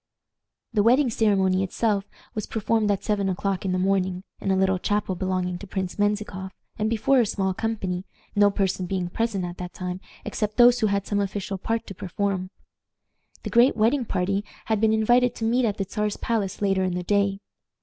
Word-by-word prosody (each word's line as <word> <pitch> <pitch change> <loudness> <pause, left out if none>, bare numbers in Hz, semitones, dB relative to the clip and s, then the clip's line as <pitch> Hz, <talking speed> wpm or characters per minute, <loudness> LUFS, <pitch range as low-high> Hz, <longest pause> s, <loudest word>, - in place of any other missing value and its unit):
The 210 - +3
wedding 245 +4 +4
ceremony 195 -4 +2
itself 200 +1 0 0.3
was 215 - -4
performed 220 0 0
at 200 -2 0
seven 200 -2 0
o'clock 190 +1 -2
in 190 - 0
the 185 - +1
morning, 185 -1 0 0.2
in - - -3
a 190 - +3
little 190 0 +2
chapel 205 0 0
belonging 185 -1 -2
to 200 - -9
Prince 190 +1 -4
Menzikoff, 205 -2 -1 0.3
and 215 +1 +1
before 230 +4 +3
a 240 - +4
small 190 -1 0
company, 190 -4 -2 0.3
no 205 0 +6
person 190 -2 -1
being 180 -1 -2
present 205 -2 -1
at 175 0 -7
that 180 0 -6
time 180 0 -4 0.3
except 215 -1 -2
those 245 0 +7
who 220 - +3
had 200 -1 0
some 205 - 0
official 195 -1 -3
part 225 +4 -2
to 195 - -8
perform. 185 +1 -2 0.9
The - - -5
great 240 +1 +5
wedding 235 +4 +2
party 195 +1 0 0.2
had 220 -2 0
been 220 -1 +4
invited 240 +3 +3
to 225 - -3
meet 240 +2 +2
at 210 -2 -1
the 195 - 0
Czar's 210 0 -2
palace 210 -4 -2
later 195 -1 +2
in 185 -1 -1
the 180 - -2
day. 200 +1 +1
200 Hz, 195 wpm, -25 LUFS, 190-220 Hz, 0.9 s, those